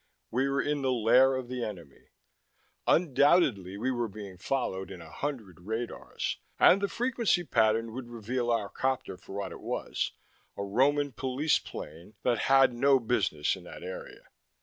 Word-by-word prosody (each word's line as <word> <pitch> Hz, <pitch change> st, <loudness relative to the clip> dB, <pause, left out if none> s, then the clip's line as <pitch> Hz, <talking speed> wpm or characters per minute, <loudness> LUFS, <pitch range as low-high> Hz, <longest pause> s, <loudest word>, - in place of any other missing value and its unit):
We 130 Hz, +3 st, +1 dB
were 140 Hz, 0 st, +1 dB
in 145 Hz, -1 st, -1 dB
the 130 Hz, -1 st, +1 dB
lair 125 Hz, +3 st, +5 dB
of 130 Hz, -2 st, -4 dB
the 125 Hz, -1 st, -4 dB
enemy. 85 Hz, -11 st, -8 dB, 0.8 s
Undoubtedly 140 Hz, -, +3 dB
we 125 Hz, +5 st, 0 dB
were 120 Hz, -2 st, -1 dB
being 100 Hz, -2 st, -9 dB
followed 95 Hz, -4 st, -2 dB
in 95 Hz, -, -8 dB
a 80 Hz, -1 st, -12 dB
hundred 115 Hz, -, -5 dB
radars, 110 Hz, +6 st, -4 dB, 0.2 s
and 195 Hz, -, +6 dB
the 200 Hz, -, +1 dB
frequency 235 Hz, -6 st, +1 dB
pattern 115 Hz, -4 st, +2 dB
would 125 Hz, 0 st, -6 dB
reveal 120 Hz, +1 st, -3 dB
our 115 Hz, -3 st, +1 dB
copter 130 Hz, -6 st, -2 dB
for 95 Hz, -, -12 dB
what 100 Hz, -, -3 dB
it -, -, -9 dB
was -, -, -2 dB, 0.4 s
a 100 Hz, -, -2 dB
Roman 140 Hz, +8 st, +2 dB
police 130 Hz, +5 st, +1 dB
plane 85 Hz, +8 st, -9 dB
that 120 Hz, -2 st, +2 dB
had 135 Hz, -2 st, +6 dB
no 135 Hz, +2 st, +4 dB
business 105 Hz, -11 st, 0 dB
in -, -, -12 dB
that -, -, -10 dB
area. 95 Hz, 0 st, -8 dB
120 Hz, 165 wpm, -29 LUFS, 100-135 Hz, 0.8 s, and